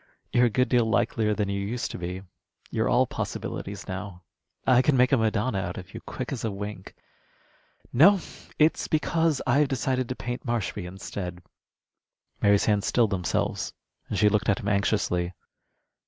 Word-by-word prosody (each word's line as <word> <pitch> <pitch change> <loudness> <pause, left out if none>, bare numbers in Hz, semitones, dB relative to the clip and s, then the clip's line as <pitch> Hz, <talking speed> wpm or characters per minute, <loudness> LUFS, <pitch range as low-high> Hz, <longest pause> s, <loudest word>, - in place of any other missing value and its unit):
You're 120 0 +5
a - - 0
good 125 +4 +2
deal 120 -2 +3
likelier 110 -2 +1
than 105 -1 0
you 100 0 -2
used 115 +4 -3
to - - -6
be. 90 +2 -5 0.5
You're - - 0
all - - +4
possibilities 100 0 -5
now. 95 -1 -6 0.4
I 125 -1 +6
could 145 +1 +3
make 125 +1 +4
a 135 - +5
Madonna 110 -1 +1
out 95 -2 -4
of 95 +1 -9
you, 115 - -7
quick 130 - -6
as 135 - -4
a 115 - 0
wink. 105 -1 -7 1.0
No, 185 +10 +7 0.4
it's 155 +1 +3
because 160 -1 +1
I've 140 +3 +3
decided 130 -1 -1
to 130 - -2
paint 120 0 -5
Marshby 115 -7 -2
instead." 90 -1 -6 1.0
Mary's 100 -1 +4
hands 105 -2 +2
stilled 115 -4 +3
themselves, 90 -3 -1 0.4
and - - -2
she 105 - +5
looked 105 +2 +2
at 100 - +2
him 100 - -5
anxiously. 100 -3 +1
110 Hz, 170 wpm, -26 LUFS, 100-125 Hz, 1.0 s, No